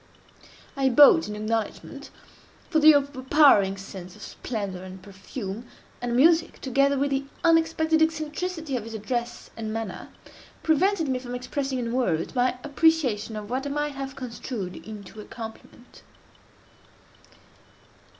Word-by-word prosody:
I 270 -1 +2
bowed 295 +6 +7
in 210 - -5
acknowledgment—for 225 - -5
the 310 0 +8
overpowering 275 -7 +4
sense 190 -2 -9
of 210 - -12
splendor 200 -6 -5
and 185 0 -9
perfume, 195 +3 -8 0.3
and 240 -1 -2
music, 325 +5 +4
together 275 +1 +2
with 280 +1 0
the 275 0 0 0.2
unexpected 320 -1 +3
eccentricity 320 0 -1
of 240 - -2
his 225 0 -8
address 240 +3 -4
and 220 -1 -5
manner, 225 -3 -5 0.5
prevented 330 +2 +2
me 260 -1 0
from 245 -1 -6
expressing, 265 +2 -3
in 235 -2 -3
words, 185 -11 0
my 250 -1 +1
appreciation 285 -8 +1
of 210 +1 -7
what 265 +2 -2
I - - -3
might 295 +1 -2
have 270 0 -6
construed 235 -6 -6
into 215 0 -10
a - - -11
compliment. 230 +2 -11
255 Hz, 130 wpm, -25 LUFS, 215-295 Hz, 0.5 s, the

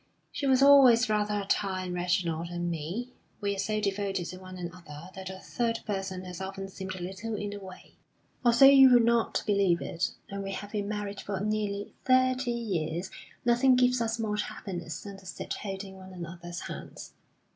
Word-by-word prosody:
She 280 - -2
was 265 0 +5
always 255 -5 +7
rather 210 -1 +1
a 200 - -4
tie 190 -1 0
on 180 -1 -4
Reginald 175 -2 0
and 175 0 -2
me. 180 +11 -4 0.3
We 200 -1 0
are - - -6
so 215 +2 0
devoted 195 -3 -1
to 185 +1 -8
one 185 0 -10
another 170 -3 -8
that 190 0 -7
a 190 - -7
third 230 +3 -2
person 195 -3 -3
has 180 0 -7
often 195 0 -5
seemed 190 0 -6
a 180 - -6
little 195 +5 -4
in 205 0 -3
the 205 - -6
way. 185 -1 -12 0.5
Although 240 +2 +7
you 270 -1 +9
would 240 -2 +6
not 235 -1 +2
believe 200 -5 +3
it, 170 +2 -2 0.2
and 200 0 -4
we 195 0 -4
have 205 +1 -6
been 205 -2 -2
married 205 -1 -4
for 200 -2 -3
nearly 205 -1 -2
thirty 255 0 +3
years, 185 -7 -2 0.3
nothing 245 +2 +5
gives 250 -1 +3
us 225 -1 0
more 215 -2 -1
happiness 175 -5 -5
than 200 -1 -8
to 195 - -16
sit 185 - -5
holding 195 -1 -6
one 190 0 -11
another's 175 0 -7
hands. - - -8
200 Hz, 190 wpm, -29 LUFS, 185-225 Hz, 0.5 s, you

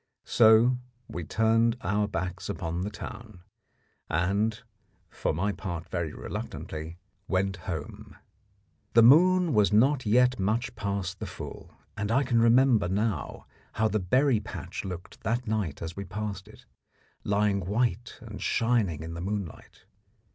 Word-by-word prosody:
So 115 +2 +5 0.3
we 85 - -5
turned 115 +5 +2
our 105 +1 0
backs 95 -1 -4
upon 85 -3 -3
the 100 - -2
town, 105 -2 -9 0.7
and, 100 +7 +1 0.5
for - - -1
my 95 +7 0
part 90 -4 -6
very 85 -4 -2
reluctantly, 80 +2 -6 0.3
went 95 0 0
home. 80 -4 -6 0.8
The 115 - +7
moon 175 +6 +6
was 105 -5 +4
not 130 +4 +3
yet 125 +2 +4
much 115 +6 -1
past 100 -4 -3
the - - -5
full, - - -9 0.2
and 105 0 -3
I 130 +4 +3
can 120 -3 +2
remember 115 -3 +4
now 105 +4 -2 0.3
how 110 0 +2
the 110 0 0
berry 125 +6 +2
patch 105 - -7
looked 90 -2 -8
that 120 +2 -1
night 105 -10 -2
as 85 +1 -6
we 100 - -5
passed 100 0 -5
it, - - -16 0.6
lying 100 -1 +1
white 115 +6 -1
and 110 -3 -9
shining 110 -10 +1
in 80 0 -6
the 85 - -6
moonlight. 95 -2 -6
105 Hz, 140 wpm, -28 LUFS, 95-115 Hz, 0.8 s, The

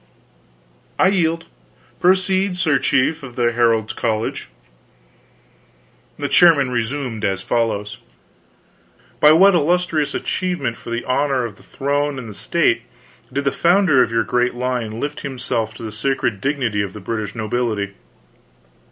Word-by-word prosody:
"I 185 - +4
yield. 165 -4 0 0.5
Proceed, 185 +1 +2
sir 160 -6 +2
Chief 140 +4 +1
of 125 -3 -10
the 120 -2 +2
Herald's 115 -2 +1
College." 110 -1 -2 1.7
The 145 - -2
chairman 140 -3 +5
resumed 120 -1 -3
as 95 -1 -1
follows: 105 -3 -1 1.2
"By 150 - +7
what 195 +5 +6
illustrious 165 -2 +1
achievement 175 -10 -2
for - - -11
the 120 +1 -3
honor 135 -1 +1
of 105 -3 -8
the - - -18
Throne 145 +1 -2
and 115 -5 -8
State 135 -6 +1 0.5
did 140 +2 -2
the 140 - +1
founder 170 -6 +3
of - - +2
your 115 0 +2
great 125 +3 0
line 120 -3 -3
lift 145 +2 -4
himself 120 -5 -3
to 115 - -10
the 110 - -5
sacred 110 -2 -1
dignity 125 -7 0
of 100 -2 -4
the 105 - -8
British 105 0 -4
nobility?" 110 -3 -2
125 Hz, 135 wpm, -20 LUFS, 115-150 Hz, 1.7 s, By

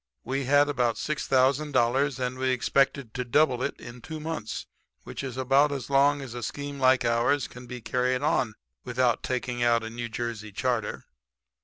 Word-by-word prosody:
We 135 +2 -2
had 145 +2 +4
about 125 -5 +1
$6,000 135 -1 +1
and 125 0 -2
we 130 0 +1
expected 130 -1 +1
to 125 - -2
double 125 0 +2
it - - -3
in 120 0 -10
two 160 +4 -7
months, 155 -8 -4 0.4
which - - -7
is 130 -2 -5
about 135 +3 +3
as 135 -2 -5
long 140 +1 +4
as 125 -3 -8
a 120 - -5
scheme 140 +4 -5
like 130 -1 +4
ours 120 +4 +2
can 125 0 -12
be 125 0 -7
carried 125 +3 0
on 125 -7 +1 0.3
without 125 -1 +1
taking 125 -1 -3
out 120 -1 +3
a 110 - -6
New 120 0 -5
Jersey 115 -2 -4
charter. 120 0 -2
130 Hz, 175 wpm, -27 LUFS, 120-140 Hz, 0.4 s, had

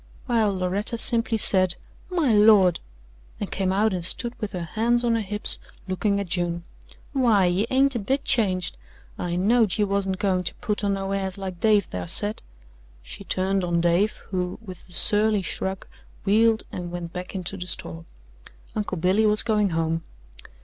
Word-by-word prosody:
While 225 -4 +2
Loretta 195 +6 -1
simply 230 0 +3
said: 185 -4 +3 0.3
"My 330 -10 +1
Lord!" 205 -4 +5 0.6
and - - -5
came 190 -1 -1
out 205 +2 +2
and 180 -2 -3
stood 235 +7 0
with 215 -1 -4
her 180 -2 -3
hands 235 +7 0
on 235 -1 +2
her 230 - +1
hips 210 +1 +2 0.3
looking 200 +2 0
at 200 - -2
June. 170 -1 -2 0.5
"Why, 230 -8 +3
ye 180 +5 +1
ain't 270 +1 +3
a 240 - -2
bit 270 +7 -1
changed! 185 -6 0 0.4
I 175 -1 -2
knowed 210 +2 +2
ye 210 - +2
wasn't 195 -1 -1
goin' 185 -2 0
to - - -1
put 210 0 -3
on 200 -1 +1
no 195 0 -4
airs 195 -1 -2
like 190 -3 -6
Dave 210 -2 +3
thar 90 -1 -6
said 205 - +1 0.3
" - - -28
she 200 - -9
turned 190 0 0
on 175 -1 0
Dave, 175 +5 +2 0.2
who, 180 -1 -2
with 185 -5 -12
a - - -10
surly 210 +2 +4
shrug, 190 +1 -4 0.4
wheeled 220 +2 +3
and 175 -1 -6
went 175 -1 -6
back 180 +1 -7
into 185 +1 -4
the 180 -1 -7
store. 165 -2 -6 0.7
Uncle 205 -3 -3
Billy 190 +6 +2
was 210 +1 +3
going 210 -3 +1
home. 165 -1 -1
195 Hz, 180 wpm, -24 LUFS, 180-215 Hz, 0.7 s, Lord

